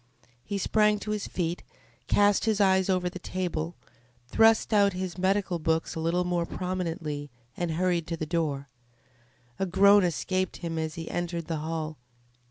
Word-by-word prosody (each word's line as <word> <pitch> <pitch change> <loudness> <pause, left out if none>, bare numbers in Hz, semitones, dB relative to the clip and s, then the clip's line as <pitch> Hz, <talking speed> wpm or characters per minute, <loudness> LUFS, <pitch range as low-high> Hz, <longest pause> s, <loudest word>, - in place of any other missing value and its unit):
He 200 - -3
sprang 210 +2 +3
to 210 - -4
his 210 -1 -2
feet, 175 -1 -2 0.5
cast 205 0 +3
his 220 -2 +1
eyes 190 -1 +3
over 185 -1 +1
the 185 +1 -5
table, 175 -3 -3 0.5
thrust 225 - +4
out 200 -2 +4
his 185 -1 -4
medical 190 -1 0
books 160 0 0
a - - -5
little 170 +2 +1
more 175 -1 -1
prominently, 165 -5 -3 0.3
and 175 -2 -2
hurried 175 -1 0
to 165 - -3
the 155 - -3
door. 150 -4 -1 0.9
A 190 - 0
groan 200 +2 +6
escaped 185 +3 -1
him 165 -2 -4
as 160 0 -3
he 165 -1 -6
entered 170 -1 -3
the 165 -1 -2
hall. 155 -1 -4
175 Hz, 165 wpm, -28 LUFS, 165-190 Hz, 0.9 s, groan